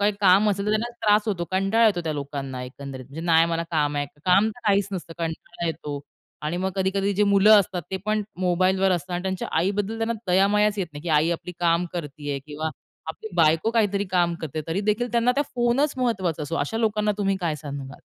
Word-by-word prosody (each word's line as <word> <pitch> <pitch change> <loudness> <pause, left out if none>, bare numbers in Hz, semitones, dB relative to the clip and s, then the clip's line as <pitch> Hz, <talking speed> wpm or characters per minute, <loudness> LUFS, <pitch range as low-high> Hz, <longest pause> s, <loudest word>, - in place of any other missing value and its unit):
काही 205 +1 +3
काम 200 +2 +5
असेल 200 0 -2
तर - - +2
त्यांना 220 +3 0 0.2
त्रास 210 0 +5
होतो. 180 -5 -1
कंटाळा 195 +5 +3
येतो 195 -5 +2
त्या 155 - -1
लोकांना 140 -3 -5
एकंदरीत. 130 0 -8
म्हणजे 140 +5 -9
नाय 165 0 +5
मला 165 0 -1
काम 150 -2 +1
आहे. 145 0 -1 0.2
काम 195 +4 +4
तर 245 +3 -14
काहीच 200 -1 +3
नसतं 170 -3 -5
कंटाळा 165 +1 -4
येतो. 150 -3 -4 0.4
आणि 155 +3 -2
मग 190 +1 -1
कधी-कधी 195 +1 +1
जे 210 +2 +3
मुलं 200 +1 +6
असतात 180 -2 -4
ते 190 - -1
पण 215 0 +1 0.2
मोबाईलवर 185 +1 +2
असतात 175 0 -3
आणि 175 - -2
त्यांच्या 190 -1 -3
आईबद्दल 200 +5 0
त्यांना 225 +1 0
दया-मायाच 205 +3 +3
येत 185 - 0
नाही, 145 +1 -9
की 175 - -5
आई 155 +2 +3
आपली 175 +1 -4
काम 170 +1 +2
करतीये 145 -4 -4
किंवा 155 +1 -4 0.4
आपली 220 +7 -6
बायको 165 +6 +3
काहीतरी 205 -3 +1
काम 175 -2 +2
करते. 155 0 -4
तरी 170 +5 -1
देखील 215 +4 0
त्यांना 235 +1 +3
त्या 285 +3 +1
फोनच 245 +5 +2
महत्वाचा 190 -11 -1
असतो, 155 +3 -3
अशा 145 +10 -2
लोकांना 210 -2 +1
तुम्ही 195 -1 +1
काय 165 -3 0
सांगाल? 140 -1 -7
185 Hz, 210 wpm, -24 LUFS, 160-210 Hz, 0.4 s, मुलं